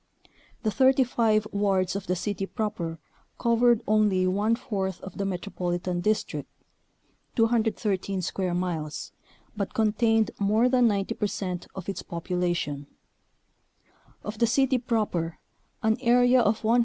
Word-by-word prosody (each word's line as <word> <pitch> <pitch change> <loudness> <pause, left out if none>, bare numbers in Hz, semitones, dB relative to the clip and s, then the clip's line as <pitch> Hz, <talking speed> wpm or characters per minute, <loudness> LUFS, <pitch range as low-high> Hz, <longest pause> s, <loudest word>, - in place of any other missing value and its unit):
The 215 - +1
35 245 -4 +3
wards 195 -2 +1
of 200 - -4
the 180 - +1
city 195 +1 -3
proper 195 -8 -3 0.4
covered 235 -1 +3
only 210 -3 +3
one 205 +5 +2
fourth 195 -6 -3
of 190 - -9
the 200 - 0
Metropolitan 180 -2 -2
District 215 +3 -1 0.9
(213 220 -5 +1
square 180 0 -1
miles), 165 -5 -3 0.4
but 200 -2 -4
contained 225 0 +2
more 215 +4 +3
than 250 -2 +4
90 200 -3 0
percent 185 -3 -3
of 190 -3 -7
its 195 - -3
population. 170 -4 -2 1.4
Of 210 +1 -6
the 235 - +4
city 260 +2 +2
proper 210 -9 -1 0.5
an 220 0 +3
area 245 +1 +5
of 220 0 +1
103. 230 +3 +4
205 Hz, 125 wpm, -27 LUFS, 185-230 Hz, 1.4 s, area